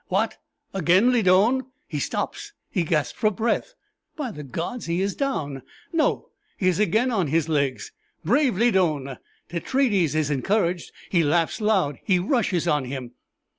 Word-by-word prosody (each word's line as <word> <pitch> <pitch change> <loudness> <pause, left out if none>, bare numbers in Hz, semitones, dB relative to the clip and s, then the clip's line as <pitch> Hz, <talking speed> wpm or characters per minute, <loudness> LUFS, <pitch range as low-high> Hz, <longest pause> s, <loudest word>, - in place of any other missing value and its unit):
What! - - 0 0.4
again 190 +6 +4
Lydon. 220 +3 +4 0.3
He 150 - -3
stops - - -3 0.2
he - - +1
gasps 155 -2 0
for 215 - +4
breath. 230 - -1 0.4
By 275 -6 -4
the 150 - -8
gods, 165 - -5
he 170 +1 0
is 195 +1 0
down! 145 - -2 0.3
No 320 -2 +1 0.3
he 185 - 0
is 185 0 +2
again 220 +4 +2
on 190 -8 +1
his 160 +2 +1
legs. 140 -5 -1 0.3
Brave 255 -2 +2
Lydon! 170 - +1 0.3
Tetraides 185 - +1
is 155 -2 +1
encouraged 175 +4 0 0.2
he 175 - +4
laughs 165 +7 +1
loud 190 -10 +1
he 185 - +3
rushes 185 - 0
on 150 -4 +1
him." 125 -2 -6
180 Hz, 150 wpm, -24 LUFS, 155-220 Hz, 0.4 s, again